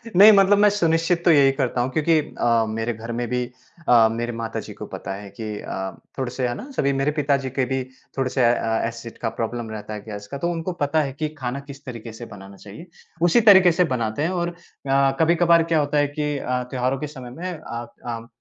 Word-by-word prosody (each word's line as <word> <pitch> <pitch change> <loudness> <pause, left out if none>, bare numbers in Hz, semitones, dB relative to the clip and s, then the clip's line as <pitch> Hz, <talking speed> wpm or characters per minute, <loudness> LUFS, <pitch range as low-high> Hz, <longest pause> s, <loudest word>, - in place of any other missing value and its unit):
नहीं 205 +4 +10
मतलब 200 0 +5
मैं 210 0 +6
सुनिश्चित 170 -3 +1
तो 175 - +7
यही 140 -3 +6
करता 130 -3 -1
हूँ 125 - 0
क्योंकि 155 +3 +3
अ, 115 -5 +1
मेरे 115 +2 -2
घर 115 +1 -7
में 120 +1 -2
भी 125 0 0 0.5
अ, 115 -2 +7
मेरे 120 +1 -3
माताजी 115 -1 -5
को - - -8
पता - - -5
है 100 +1 -8
कि - - -4 0.2
अ, 95 0 -4 0.3
थोड़े-से 130 -1 -2
है 120 - -2
ना 270 - -8
सभी 140 0 +2
मेरे 135 +2 +1
पिताजी 140 -3 0
के 130 0 0
भी 130 +1 -1 0.3
थोड़े 135 -1 0
से 130 0 +1
अ, 115 -1 +1
एसिड 115 0 -8
का 115 - 0
प्रॉब्लम 115 0 -3
रहता 110 0 -6
है 105 - -6
गैस 105 -2 -7
का 140 - -4
तो 170 +5 -1
उनको 170 +2 -3
पता 145 +2 +2
है 140 - -3
कि 155 -1 -1
खाना 130 0 -3
किस 140 0 -11
तरीके 115 -3 -7
से 120 +2 -8
बनाना 100 -3 -12
चाहिए, 105 - -11 0.3
उसी 175 +7 +5
तरीके 190 -5 +7
से 180 +2 +3
बनाते 115 0 -2
हैं 165 - +1
और 175 0 0 0.4
अ, 135 0 +4
कभी-कभार 170 0 +4
क्या 160 - +4
होता 145 0 0
है 145 0 +3
कि 150 0 -2
अ, 125 -1 -2
त्योहारों 130 0 0
के 150 - -3
समय 130 -4 -9
में 180 +8 -5
अ 120 -7 -7 0.2
अ, 115 -1 -5
135 Hz, 230 wpm, -23 LUFS, 115-160 Hz, 0.5 s, नहीं